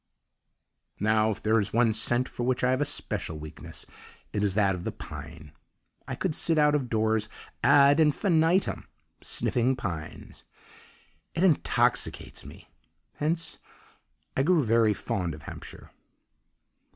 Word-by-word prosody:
Now, 110 +1 +2
if 105 -1 -4
there 110 +1 +3
is 100 - -3
one 115 -1 +3
scent 120 +3 +2
for - - -7
which 125 +1 0
I 125 - +3
have 130 +2 +1
a - - +2
special 105 - -3
weakness, 75 0 -9 0.5
it 105 - 0
is 100 -2 0
that 100 -2 +3
of 90 -1 -6
the - - -3
pine. 80 -2 -10 0.6
I - - -4
could 185 -4 -2
sit 165 +1 +1
out 150 -1 +4
of 135 -5 0
doors 110 -1 0 0.3
ad 140 +1 +6
infinitum 165 +3 +2 0.3
sniffing 125 +2 +1
pines. 85 -10 -7 0.9
It 170 - 0
intoxicates 175 -6 +1
me; - - -13 0.5
hence 160 +2 -2 0.8
I - - +2
grew 160 +1 +3
very 115 -2 +3
fond 90 -5 -3
of 75 - -13
Hampshire. - - -10
115 Hz, 140 wpm, -27 LUFS, 105-150 Hz, 0.9 s, ad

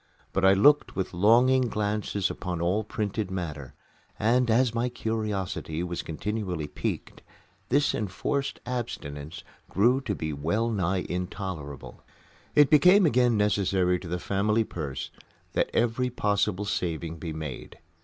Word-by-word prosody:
But 95 - 0
I 95 0 +7
looked 145 +10 +4
with 95 -1 -2
longing 120 +7 +4
glances 105 -2 -1
upon 90 -1 -4
all 90 +6 +1
printed 105 -1 -3
matter 75 -8 -5 0.4
and, 120 +3 +2
as 115 +1 +3
my 120 +2 0
curiosity 105 -8 -3
was 90 -1 -3
continually 90 -1 -3
piqued, 75 - -5 0.5
this 145 +3 +3
enforced 135 +8 -2
abstinence 85 -11 -5 0.3
grew 120 +7 +3
to 105 -6 -2
be 80 -3 -3
well 105 +11 0
nigh 95 -3 0
intolerable. 90 - -5 0.5
It 145 -2 +6
became 180 +6 +7
again 125 -5 +3
necessary 95 -3 +2
to 90 - -9
the 90 +2 -2
family 105 +5 +1
purse 75 -10 -5 0.4
that - - +1
every 120 +2 +1
possible 105 -3 0
saving 85 -4 -2
be 80 -1 -5
made. 75 -3 -7
100 Hz, 135 wpm, -27 LUFS, 90-115 Hz, 0.5 s, I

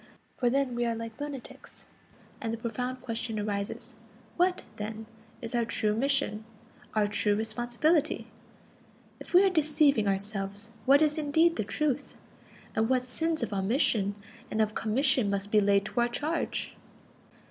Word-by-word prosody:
For 245 - +1
then 270 0 +1
we 240 0 -1
are 230 - 0
like 230 +2 -7
lunatics; 290 -3 -9 0.6
and 225 -3 -2
the 230 - -3
profound 250 +3 -4
question 230 -2 -2
arises: 205 +3 -4 0.4
What, 360 +1 +2
then, 215 +1 -5 0.4
is 230 - -3
our 240 -1 +2
true 215 -2 0
mission, 275 -3 +1 0.5
our 215 -1 +3
true 205 0 +1
responsibility? 240 +8 +1 0.9
If - - -5
we 365 - +8
are 390 - +5
deceiving 295 - +3
ourselves, 200 +1 -2 0.2
what 280 +3 +7
is 305 +1 +1
indeed 320 +3 +3
the - - -1
truth? 275 +6 -2 0.6
And 225 +1 +1
what 255 -1 +2
sins 315 +3 -1
of 225 - -3
omission 205 0 +2 0.3
and 215 - -3
of 215 -1 +2
commission 250 0 +2
must 200 0 -2
be 215 - +5
laid 200 0 +3
to 240 - -3
our 240 0 +3
charge? 300 +7 -2
235 Hz, 150 wpm, -29 LUFS, 215-280 Hz, 0.9 s, we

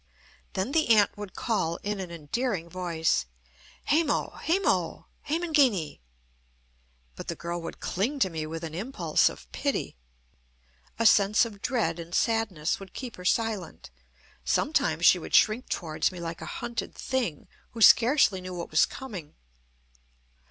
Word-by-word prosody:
Then 195 +7 -2
the 315 -3 +2
aunt 215 -3 +5
would 205 -3 -8
call, 190 -8 -1
in 205 0 -2
an 185 -2 -5
endearing 170 - -3
voice: 165 - 0 0.6
"Hemo! 305 -1 +1
Hemo! 370 +4 0 0.2
Hemangini." 290 - +2 1.2
But - - -8
the - - -3
girl 170 0 -4
would 165 - -7
cling 235 +11 -1
to 190 - +4
me 155 -1 -4
with 165 +1 -6
an 160 -1 -5
impulse 230 +11 +1
of - - -11
pity. 280 - -2 1.0
A 230 - 0
sense 210 +1 +5
of 205 -3 -9
dread 195 -10 0
and 170 +1 -6
sadness 220 -9 0
would 195 -2 -12
keep 250 -3 -6
her 180 - -10
silent. 200 - -1 0.5
Sometimes - - +1
she - - +7
would - - -2
shrink 220 +4 +3
towards 160 -1 -1
me 180 - -9
like 165 0 -6
a - - -6
hunted 235 -1 -5
thing, 245 - -2 0.3
who 230 - -7
scarcely 230 -6 +6
knew 185 0 -7
what 170 -1 -6
was 155 - +4
coming. 190 - -8
200 Hz, 145 wpm, -27 LUFS, 170-240 Hz, 1.2 s, she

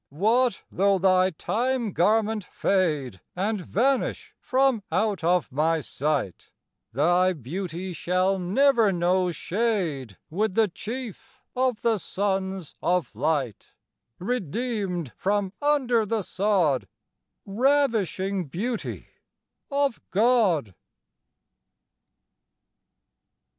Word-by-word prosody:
What 220 - +1
though 195 +1 +3
thy 185 0 +4
time 235 +6 -1
garment 215 +2 +2
fade 150 - 0
And 200 +2 -1
vanish 255 +9 0
from 260 -3 +2
out 205 -6 0
of 175 -3 +2
my 160 +4 +1
sight, 140 - -2 0.4
Thy 175 +8 +3
beauty 175 - -5
shall 185 +4 0
never 225 +4 +3
know 180 +1 +1
shade 170 - -2
With 200 +3 -1
the 225 -1 +4
Chief 240 +5 -8
of 255 -3 0
the 230 -3 +2
sons 190 -2 -2
of 180 0 0
light 145 -8 -2 0.4
Redeemed 195 - -2
from 200 -1 0
under 265 -6 +2
the 220 -1 -1
sod, 180 -9 +1 0.6
Ravishing 205 - +1
beauty 215 - -4 0.6
of 280 -3 0
God! 200 - +2
195 Hz, 90 wpm, -25 LUFS, 175-230 Hz, 0.6 s, thy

